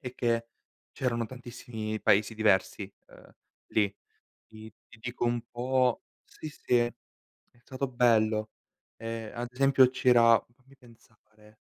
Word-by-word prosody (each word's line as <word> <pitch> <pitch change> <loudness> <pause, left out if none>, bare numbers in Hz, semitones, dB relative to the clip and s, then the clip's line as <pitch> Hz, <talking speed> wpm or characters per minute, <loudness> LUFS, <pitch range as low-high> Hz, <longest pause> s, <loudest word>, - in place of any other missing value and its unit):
è 125 -3 -7
che 115 -1 0 0.4
c'erano 120 -3 -1
tantissimi 115 -3 -6
paesi 105 +3 +3
diversi, 100 -1 +1 0.2
uhm, - - -17 0.4
lì. 100 -2 +1 0.6
Ti 110 0 -12 0.2
ti 115 - -17
dico 120 +1 -4
un 120 0 0
po' 125 0 +1 0.2
sì, 155 - -9
sì 130 -3 0
è 120 - +3 0.7
è 120 - -27
stato 130 +2 -4
bello. 110 -3 +2 0.5
Ehm, 115 -1 -6
ad 120 0 -4
esempio 135 0 +5
ci 130 0 -1
era 115 -2 +6
fammi 135 +2 -23
pensare, 110 -3 -22
120 Hz, 135 wpm, -29 LUFS, 110-125 Hz, 0.7 s, era